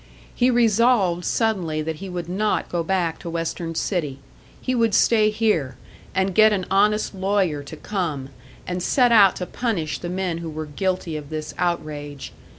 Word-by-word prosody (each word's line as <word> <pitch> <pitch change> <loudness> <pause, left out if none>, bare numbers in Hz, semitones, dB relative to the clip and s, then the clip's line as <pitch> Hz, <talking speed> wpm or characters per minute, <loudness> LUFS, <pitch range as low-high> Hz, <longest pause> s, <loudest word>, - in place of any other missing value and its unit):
He 250 +1 +3
resolved 230 -6 +3
suddenly 180 -9 0
that 160 0 -4
he 195 +2 -7
would 175 -2 -5
not 205 +4 -1
go 175 - -1
back 175 -2 -1
to 170 - -7
Western 165 0 -3
City; 155 -7 -1 0.4
he 255 - -2
would 230 -4 +2
stay 215 -2 +4
here, 190 - 0 0.4
and 190 0 +1
get 215 +3 +6
an 190 -3 0
honest 210 +3 +2
lawyer 190 -5 0
to 145 +3 -9
come, 155 -9 -3 0.4
and 180 0 -3
set 245 +6 +3
out 200 -5 +7
to 180 - -4
punish 180 -10 -2
the 175 - -5
men 180 -2 -2
who 170 -1 -5
were 155 0 -5
guilty 175 +2 -2
of 145 -2 -9
this 155 -1 -5
outrage. 150 -5 -3
180 Hz, 170 wpm, -23 LUFS, 160-210 Hz, 0.4 s, out